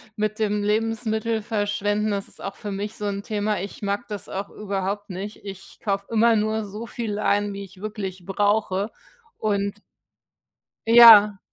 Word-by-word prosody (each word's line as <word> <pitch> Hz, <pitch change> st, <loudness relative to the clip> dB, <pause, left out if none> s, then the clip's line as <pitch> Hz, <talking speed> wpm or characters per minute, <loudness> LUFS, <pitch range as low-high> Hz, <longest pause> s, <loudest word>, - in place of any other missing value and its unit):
mit 215 Hz, 0 st, -1 dB
dem 210 Hz, -1 st, 0 dB
Lebensmittel 220 Hz, +1 st, 0 dB
verschwenden, 205 Hz, 0 st, -1 dB
das 200 Hz, -1 st, -2 dB
ist -, -, -14 dB
auch 195 Hz, -, -5 dB
für 210 Hz, -3 st, -6 dB
mich 205 Hz, +2 st, -4 dB
so 210 Hz, -, -5 dB
'n 200 Hz, -1 st, -3 dB
Thema. 210 Hz, -1 st, -1 dB
Ich 200 Hz, -, -8 dB
mag 200 Hz, +3 st, -2 dB
das 210 Hz, -3 st, -7 dB
auch 195 Hz, +1 st, -4 dB
überhaupt 200 Hz, 0 st, -4 dB
nicht. 195 Hz, +4 st, -7 dB
Ich 195 Hz, -2 st, -10 dB
kaufe 200 Hz, -2 st, -1 dB
immer 230 Hz, +1 st, +4 dB
nur 215 Hz, 0 st, 0 dB
so 210 Hz, +3 st, -7 dB
viel 225 Hz, -3 st, -4 dB
ein, 205 Hz, -1 st, +1 dB
wie 200 Hz, 0 st, -6 dB
ich 190 Hz, -1 st, -14 dB
wirklich 195 Hz, -4 st, -5 dB
brauche 205 Hz, 0 st, 0 dB, 0.5 s
und 200 Hz, -1 st, -1 dB, 1.1 s
Ja. 225 Hz, -3 st, +9 dB
205 Hz, 160 wpm, -24 LUFS, 200-215 Hz, 1.1 s, Ja